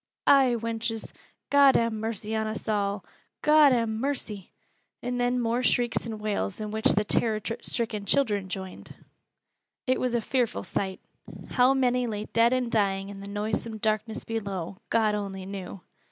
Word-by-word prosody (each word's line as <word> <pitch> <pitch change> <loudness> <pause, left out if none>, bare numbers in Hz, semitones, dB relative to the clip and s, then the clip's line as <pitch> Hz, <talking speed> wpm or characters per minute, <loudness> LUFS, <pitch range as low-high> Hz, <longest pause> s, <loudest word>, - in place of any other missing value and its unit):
"Ay, 265 -3 +5
wenches, 225 0 -3 0.4
God 280 -1 +7
ha' 230 0 +3
mercy 220 0 -3
on 220 0 0
us 215 +1 -5
aw' 200 -2 0 0.4
God 300 -2 +7
ha' 235 -2 +2
mercy!" 220 -4 -3 0.5
And 245 0 -2
then 245 +1 +1
more 235 +1 0
shrieks 240 -1 +1
and 220 -2 -5
wails, 210 -2 -2
in 215 -1 -4
which 220 0 +3
the 210 - +2
terror 215 +1 +2 0.2
stricken 220 -4 -2
children 205 -9 +1
joined. 190 -1 -7 0.9
It 255 0 +1
was 250 -1 0
a 235 - +1
fearful 245 0 0
sight. 190 -1 -3 0.5
How 255 +1 +4
many 250 -2 +2
lay 210 -1 -3
dead 230 +2 +3
and 255 -2 0
dying 195 -3 +1
in 200 -1 -8
the 200 - -8
noisome 215 +2 -3
darkness 215 +1 -1
below, 200 -5 -4
God 220 -2 +2
only 195 -2 -4
knew! 195 -1 -7
220 Hz, 160 wpm, -27 LUFS, 205-245 Hz, 0.9 s, God